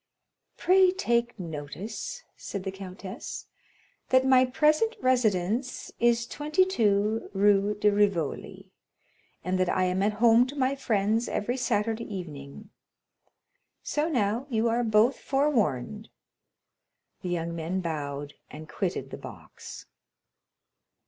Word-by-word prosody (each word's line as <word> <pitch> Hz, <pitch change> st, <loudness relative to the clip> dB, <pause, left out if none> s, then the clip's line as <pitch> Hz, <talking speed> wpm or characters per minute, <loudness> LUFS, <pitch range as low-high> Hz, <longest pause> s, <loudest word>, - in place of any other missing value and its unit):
"Pray 375 Hz, 0 st, +5 dB
take 240 Hz, -, 0 dB
notice," 180 Hz, -, -6 dB
said 200 Hz, -2 st, -6 dB
the 190 Hz, -, -3 dB
countess, 195 Hz, +4 st, -8 dB, 0.6 s
"that 260 Hz, 0 st, +4 dB
my 260 Hz, -1 st, +6 dB
present 305 Hz, -, +2 dB
residence 240 Hz, -1 st, 0 dB
is 235 Hz, 0 st, +3 dB
22 230 Hz, -, +1 dB
Rue 205 Hz, +1 st, +3 dB
de 210 Hz, 0 st, +3 dB
Rivoli, 200 Hz, -7 st, -1 dB, 0.7 s
and 185 Hz, +1 st, -1 dB
that 185 Hz, -1 st, +2 dB
I 185 Hz, -, +1 dB
am 185 Hz, +1 st, 0 dB
at 210 Hz, +2 st, +2 dB
home 230 Hz, +3 st, +5 dB
to 280 Hz, -, -8 dB
my 265 Hz, -1 st, +1 dB
friends 225 Hz, -3 st, 0 dB
every 240 Hz, +5 st, -1 dB
Saturday 225 Hz, -3 st, -1 dB
evening. 150 Hz, -8 st, -8 dB, 1.1 s
So 300 Hz, +2 st, -1 dB
now, 235 Hz, -1 st, 0 dB
you 230 Hz, -2 st, +1 dB
are 235 Hz, +2 st, +1 dB
both 220 Hz, +3 st, +3 dB
forewarned." 220 Hz, -, 0 dB, 1.1 s
The 180 Hz, -, -4 dB
young 170 Hz, -1 st, -2 dB
men 170 Hz, +3 st, -2 dB
bowed, 145 Hz, -4 st, -4 dB, 0.2 s
and 155 Hz, +1 st, -10 dB
quitted 180 Hz, +4 st, -3 dB
the -, -, -6 dB
box. -, -, -11 dB
215 Hz, 115 wpm, -27 LUFS, 185-255 Hz, 1.1 s, my